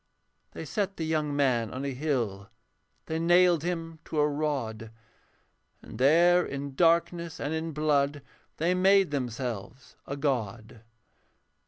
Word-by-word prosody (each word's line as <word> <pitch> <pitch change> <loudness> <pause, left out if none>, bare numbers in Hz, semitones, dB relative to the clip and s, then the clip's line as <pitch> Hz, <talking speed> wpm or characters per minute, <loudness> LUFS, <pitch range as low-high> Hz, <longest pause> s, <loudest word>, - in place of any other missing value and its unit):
They - - -7
set 200 -2 -2
the 165 - -3
young 155 -2 -1
man 125 -6 +1
on 130 +2 -5
a 140 - -2
hill, 120 -8 -2 0.6
They 160 0 -3
nailed 175 0 +4
him 165 -1 -4
to 160 - -5
a 150 0 +4
rod; 140 -7 -3 0.9
And - - -10
there 170 +6 +5
in 140 -1 -5
darkness 170 +1 +1
and 145 +2 -3
in 160 +1 -3
blood 145 -1 0 0.3
They 170 +3 +1
made 190 -1 +4
themselves 125 -3 -5
a 140 - -4
god. 120 -5 -3
150 Hz, 135 wpm, -28 LUFS, 130-165 Hz, 0.9 s, there